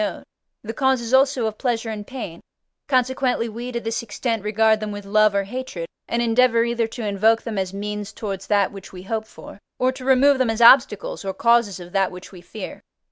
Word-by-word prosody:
note) - - -4 0.4
the 225 +1 -5
causes 260 -1 0
also 265 -2 +3
of 215 -1 -4
pleasure 235 -3 -1
and 210 -1 -7
pain; 225 -11 -7 0.5
consequently 255 -2 +1
we, 235 +3 -6
to 235 - -2
this 225 0 -3
extent, 230 0 -3
regard 220 +1 +2
them 215 -1 -4
with 205 -1 -7
love 215 0 +3
or 200 - +2
hatred, 215 -5 -6 0.2
and 235 0 0
endeavour 230 0 +3
either 235 -1 0
to 225 0 -6
invoke 215 +3 +2
them 220 -4 -3
as 190 -1 -2
means 205 +1 -5
towards 195 -3 -6
that 200 -2 +2
which 195 -2 -11
we 180 -1 -10
hope 220 +2 -3
for, - - -13 0.2
or 255 0 +2
to 260 0 -10
remove 265 +1 +4
them 255 -3 +2
as 225 0 -2
obstacles, 235 -5 +5
or 190 -1 -4
causes 235 -2 +2
of 175 0 -11
that 195 0 +1
which 180 0 -11
we 180 -3 -12
fear. 190 +3 -9
225 Hz, 210 wpm, -22 LUFS, 200-245 Hz, 0.5 s, obstacles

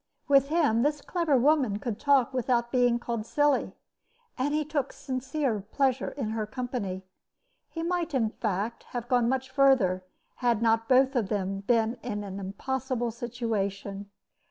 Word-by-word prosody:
With 275 -2 +5
him 290 -8 +2
this 295 +3 +1
clever 325 -2 +1
woman 265 -5 +3
could 215 -1 -4
talk 275 -3 +3
without 240 -2 0
being 245 -2 +3
called 235 -2 -3
silly, 290 +4 +1 0.6
and 275 +2 -1
he 305 0 0
took 290 -2 -2
sincere 260 -2 -2
pleasure 270 -2 +1
in 240 -6 -4
her 220 -1 -2
company. 215 -6 -4 0.7
He 330 - -5
might, 340 -3 -1
in 225 -4 +1
fact, 215 +1 -2
have 240 -1 -3
gone 245 -2 +2
much 260 0 -1
further, 260 -10 +3 0.3
had 240 -3 +1
not 225 0 +2
both 265 +1 +4
of 220 -6 0
them 195 -2 -1
been 230 +3 +1
in 205 -2 -4
an 195 -1 -6
impossible 245 +5 -3
situation. 205 -4 -3
245 Hz, 155 wpm, -28 LUFS, 220-270 Hz, 0.7 s, With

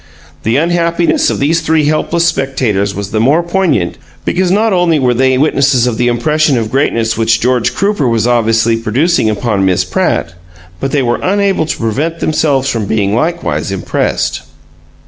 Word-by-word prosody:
The 115 +2 0
unhappiness 170 - +1
of - - -2
these 160 +4 +1
three 160 -1 +1
helpless 160 +3 0
spectators 130 - -1
was 100 -1 -5
the 110 - 0
more 145 +9 +2
poignant 170 - -1 0.3
because 185 0 0
not 215 +3 +2
only 175 -3 +2
were 125 -3 +1
they 130 +1 +2
witnesses 140 -3 +2
of 120 -2 -2
the 120 - +2
impression 150 +4 +1
of 110 -1 -3
greatness 115 -5 0
which 115 0 +2
George 125 -1 0
Crooper 200 -8 0
was 115 -2 0
obviously 115 -1 +2
producing 120 +4 +1
upon 105 -2 -1
Miss 95 -2 +2
Pratt, 85 - -1 0.5
but 135 - -2
they 140 -1 0
were 120 -1 0
unable 195 -4 0
to - - -3
prevent 140 +9 -2
themselves 145 -4 0
from 115 -6 -2
being 100 -1 0
likewise 165 - -1
impressed. 95 -2 -2
130 Hz, 165 wpm, -13 LUFS, 115-165 Hz, 0.5 s, more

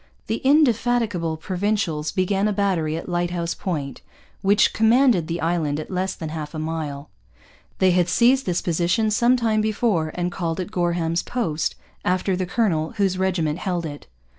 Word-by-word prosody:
The 225 - -1
indefatigable 240 - +2
Provincials 180 -4 -1
began 195 +2 +1
a 210 - 0
battery 180 -6 0
at - - -7
Lighthouse 175 -1 -1
Point, 150 -7 -4 0.4
which 200 +2 +3
commanded 225 - +4
the 170 0 -3
island 160 -3 0
at 155 - -7
less 185 +1 -1
than 160 - -6
half 155 0 -6
a - - -3
mile. 155 -4 -4 0.7
They 185 -1 +4
had 175 -1 +2
seized 250 +6 +3
this 180 -1 0
position 175 +6 +1
some 240 +4 +3
time 220 -3 +1
before 210 -7 0
and 180 0 -1
called 165 -2 -3
it 185 +2 -4
Gorham's 170 -3 0
Post, 165 -11 -2 0.3
after 185 +1 +1
the 185 0 -2
colonel 170 -7 0
whose 190 -2 0
regiment 175 -4 0
held 175 -3 -2
it. 145 -2 -8
180 Hz, 165 wpm, -23 LUFS, 165-210 Hz, 0.7 s, commanded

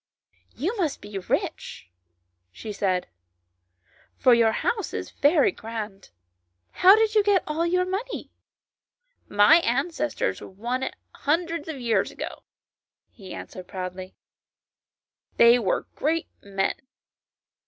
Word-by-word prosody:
" - - -37
You 385 +8 0
must 325 -7 -1
be 205 -1 -6
rich," 90 - -3 0.6
she 210 - -7
said, 185 -3 0 0.6
" 90 -1 -36
for 250 - +7
your 230 -1 +4
house 425 - -2
is - - -5
very 290 +1 +3
grand. 215 -3 -7 0.6
How 380 +2 +7
did 440 0 +2
you 430 - +5
get 400 -3 +3
all 320 +3 -1
your 365 +1 +2
money 400 +7 -4 0.3
?" - - -69
" - - -44
My 265 +10 +8
ancestors 300 +2 -1
won 235 +7 -4
it - - -3 0.2
hundreds 330 +1 -1
of 310 -4 -5
years 225 -5 +1
ago," - - -7 0.7
he 190 -4 -12
answered 180 0 -8
proudly. 185 0 -6 0.6
" - - -48
They 235 +1 +7
were 195 -6 0
great 320 +3 0 0.2
men." 195 -1 -1
250 Hz, 130 wpm, -25 LUFS, -, 0.7 s, My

